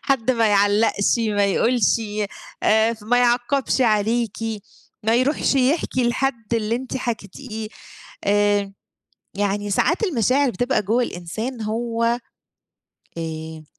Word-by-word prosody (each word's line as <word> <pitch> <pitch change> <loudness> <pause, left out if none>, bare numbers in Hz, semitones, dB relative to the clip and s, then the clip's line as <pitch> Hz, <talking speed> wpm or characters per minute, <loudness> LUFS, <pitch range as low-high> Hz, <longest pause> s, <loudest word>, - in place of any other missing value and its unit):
حد 265 -3 +1
ما 230 -3 +2
يعلّقش، 205 +2 +3
ما 210 -3 +1
يقولش، 230 +3 +2 0.7
آآ، 220 +2 +4
ف 215 - -17
ما 245 +3 +2
يعَقّبش 245 +3 +1
عليكِ، 225 0 +1 0.7
ما 225 +2 +2
يروحش 270 +4 +2
يحكي 260 -2 +1
لحد 235 -3 -1
اللي 225 +1 0
أنت 260 +1 -5
حكيتيه. 220 -1 -5 0.6
آآ، 205 -1 +2 0.6
يعني 205 0 -1
ساعات 330 - +1
المشاعر 270 - +2
بتبقى 245 -1 0
جوّه 225 +6 +1
الإنسان 220 +5 -5
هو 230 +2 -2 1.1
آآ 160 -1 -6
230 Hz, 115 wpm, -22 LUFS, 205-250 Hz, 1.1 s, آآ